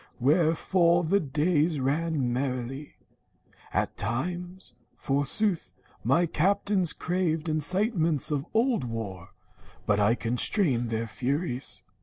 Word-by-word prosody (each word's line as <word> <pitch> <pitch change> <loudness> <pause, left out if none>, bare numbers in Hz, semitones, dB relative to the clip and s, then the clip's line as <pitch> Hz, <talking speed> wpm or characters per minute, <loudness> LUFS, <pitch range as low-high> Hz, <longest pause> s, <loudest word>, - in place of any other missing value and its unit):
Wherefore 170 +4 +3
The 190 +5 +2
days 155 +1 +1
ran 140 -1 0
merrily. 130 +2 -4 0.8
At - - -1
times, 175 - -3 0.2
forsooth, 150 +7 0 0.3
My 140 +9 +3
captains 190 +2 +1
craved 175 -3 -1
incitements 165 - +1
of 145 +2 -2
old 230 - +1
war, 110 -7 -6 0.5
But 105 -1 +2
I 105 +3 +3
constrained 125 - +1
their 115 0 -1
furies. 130 - -2
155 Hz, 100 wpm, -27 LUFS, 125-175 Hz, 0.8 s, Wherefore